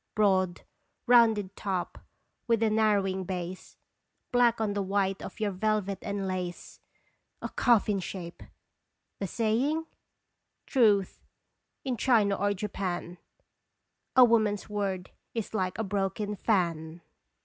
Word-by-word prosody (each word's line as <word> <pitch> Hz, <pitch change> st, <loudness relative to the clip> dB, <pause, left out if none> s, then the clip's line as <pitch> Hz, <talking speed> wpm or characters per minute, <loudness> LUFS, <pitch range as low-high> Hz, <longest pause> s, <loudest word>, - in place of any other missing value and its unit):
Broad, 190 Hz, -4 st, +2 dB, 0.4 s
rounded 225 Hz, -5 st, +4 dB
top 190 Hz, -3 st, -3 dB, 0.5 s
with 230 Hz, -1 st, +2 dB
a 220 Hz, -, +3 dB
narrowing 200 Hz, -3 st, +2 dB
base, 180 Hz, 0 st, -6 dB, 0.5 s
Black 240 Hz, -2 st, +3 dB
on 215 Hz, -2 st, 0 dB
the 200 Hz, -, -1 dB
white 195 Hz, 0 st, 0 dB
of -, -, -8 dB
your 210 Hz, -2 st, 0 dB
velvet 200 Hz, 0 st, -1 dB
and 200 Hz, -1 st, -3 dB
lace, 180 Hz, -2 st, -5 dB, 0.6 s
A -, -, -5 dB
coffin 215 Hz, -4 st, +3 dB
shape! 175 Hz, -2 st, -7 dB, 0.8 s
The 195 Hz, -, -2 dB
saying? 245 Hz, -, 0 dB, 0.8 s
Truth 210 Hz, -7 st, +2 dB, 0.6 s
in 255 Hz, -2 st, -1 dB
China 220 Hz, -5 st, +3 dB
or 205 Hz, +1 st, 0 dB
Japan 185 Hz, -3 st, -4 dB, 1.0 s
A 255 Hz, -, +9 dB
woman's 215 Hz, -3 st, +2 dB
word 195 Hz, -3 st, -3 dB, 0.2 s
is 225 Hz, -2 st, -3 dB
like 185 Hz, -4 st, -1 dB
a 220 Hz, -, -1 dB
broken 205 Hz, +1 st, -2 dB
fan 170 Hz, -5 st, -1 dB
200 Hz, 115 wpm, -29 LUFS, 185-220 Hz, 1.0 s, A